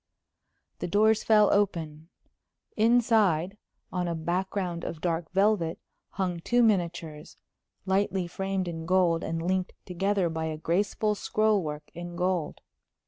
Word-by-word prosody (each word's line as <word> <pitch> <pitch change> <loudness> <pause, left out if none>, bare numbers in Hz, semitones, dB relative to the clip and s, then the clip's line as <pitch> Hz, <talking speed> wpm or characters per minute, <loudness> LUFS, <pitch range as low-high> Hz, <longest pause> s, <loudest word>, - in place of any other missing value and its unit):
The - - -3
doors 215 +4 +3
fell 210 -2 +5
open. 165 -6 -1 0.7
Inside, 215 -6 +3 0.4
on 180 -1 -1
a 170 - -2
background 175 +1 -2
of 165 - -5
dark 165 -1 -2
velvet, 195 -4 +2 0.4
hung 180 -3 -2
two 240 +8 +2
miniatures, 170 -7 -1 0.5
lightly 190 -1 +1
framed 190 +1 -3
in 165 -1 -5
gold 180 -2 +2
and 165 0 -3
linked 185 0 -1
together 195 +1 0
by 160 -1 -3
a 155 -1 -3
graceful 200 +6 0
scroll 215 0 +1
work 150 -2 -6
in 175 0 -7
gold. 180 -3 -1
180 Hz, 130 wpm, -28 LUFS, 165-200 Hz, 0.7 s, fell